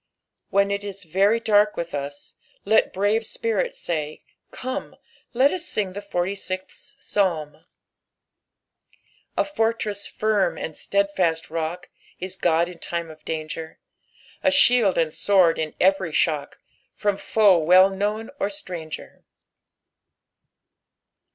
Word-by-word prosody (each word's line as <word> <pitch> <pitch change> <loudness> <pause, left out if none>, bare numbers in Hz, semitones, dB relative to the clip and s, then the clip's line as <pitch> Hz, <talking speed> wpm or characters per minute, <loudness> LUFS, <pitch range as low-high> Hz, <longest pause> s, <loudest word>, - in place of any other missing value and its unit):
When 200 0 +2
it 200 0 -2
is 200 -1 -7
veiy 200 +7 +2
dark 210 0 +3
with 170 0 -4
us, 145 0 -6 0.3
let 220 +2 +3
brave 205 +4 +1
spirits 225 -2 -1
say, 155 -3 -4 0.3
"Come, 255 0 -5 0.4
let 265 +3 +4
us 365 -3 -3
sing 195 -3 -2
the 205 - -6
forty 190 -1 -2
sistli 185 -1 -7
Psalm," 160 -6 -1 0.8
" - - -39
A - - +4
fortreu 225 -7 -1
Shd, 200 -1 0
and 160 - -4
nieidfist 185 -4 0
rorb. 165 +2 -3 0.4
Is 185 +1 -4
Oixl 170 -1 0
|p - - -8
lime 170 -1 -5
of 155 -1 -16
danfccr; 160 0 -5 0.7
A 285 - +5
ihleld 245 -8 +4
and 165 -2 +2
Bword 185 -2 +3
in 155 -1 -3
every 190 -2 +3
shock. 150 -2 0 0.4
From 205 -2 0
toe 205 -5 +4
well 185 +4 +6
known 210 +3 -2
or - - +1
stnng;er." 180 -6 -8
190 Hz, 125 wpm, -24 LUFS, 165-205 Hz, 0.8 s, well